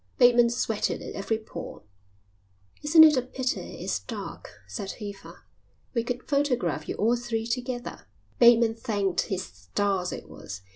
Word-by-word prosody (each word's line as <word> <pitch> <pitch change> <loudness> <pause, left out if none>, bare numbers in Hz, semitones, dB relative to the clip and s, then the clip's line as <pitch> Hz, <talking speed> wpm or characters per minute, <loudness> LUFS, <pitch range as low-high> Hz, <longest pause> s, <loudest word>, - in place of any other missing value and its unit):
Bateman 240 -1 +6
sweated 225 -2 -1
at - - -7
every 200 +3 -1
pore. 220 - -9 1.0
"Isn't 315 +2 +8
it 305 -3 +7
a - - +3
pity 255 +1 -4
it's - - 0
dark?" - - -7 0.2
said 200 -4 -5
Eva. 200 -2 -9 0.5
"We 235 -3 +1
could 245 +1 -4
photograph 280 -4 0
you - - -2
all 230 +3 +2
three 235 -2 -3
together." 245 +1 -4 0.3
Bateman 235 -1 +6
thanked 205 -5 -1
his 190 -1 -2
stars 195 -2 -2
it - - -7
was. 95 -1 -9
235 Hz, 145 wpm, -27 LUFS, 205-250 Hz, 1.0 s, Isn't